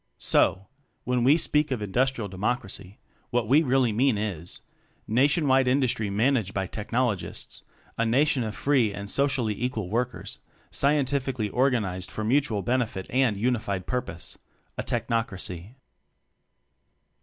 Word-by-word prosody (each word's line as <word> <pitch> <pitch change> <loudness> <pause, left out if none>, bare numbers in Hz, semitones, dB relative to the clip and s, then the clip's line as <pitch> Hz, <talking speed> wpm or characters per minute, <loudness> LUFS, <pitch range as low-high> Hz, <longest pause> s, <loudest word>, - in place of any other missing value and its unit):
So, 95 - +2 0.4
when 125 -1 0
we 140 +6 +6
speak 150 -2 +2
of 130 -4 -1
Industrial 115 +2 0
De 95 - -10
mocracy, 100 -2 -3 0.3
what 120 -3 0
we 140 +7 +5
really 130 -5 +2
mean 120 +1 +2
is: 95 -5 -5 0.5
Nation 140 +7 +3
wide 130 -1 +4
Industry 125 -5 +1
managed 110 -1 +1
by 95 -1 0
Technologists 110 +1 -3 0.4
a 115 - +3
Nation 135 +3 +3
of 110 -1 -4
free 130 -7 +2
and 100 0 -6
socially 135 -6 +1
equal 110 -5 -3
workers, 125 +2 -2 0.3
scientifically 135 -5 +1
organized 105 -8 0
for 110 - -5
mutual 115 -3 +1
benefit 115 -4 -1
and 125 -5 +2
uni 120 +3 +1
fied 100 -4 -4
purpose 95 -9 -4 0.4
a - - -2
Technocracy. 115 -4 -3
120 Hz, 130 wpm, -26 LUFS, 105-130 Hz, 0.5 s, we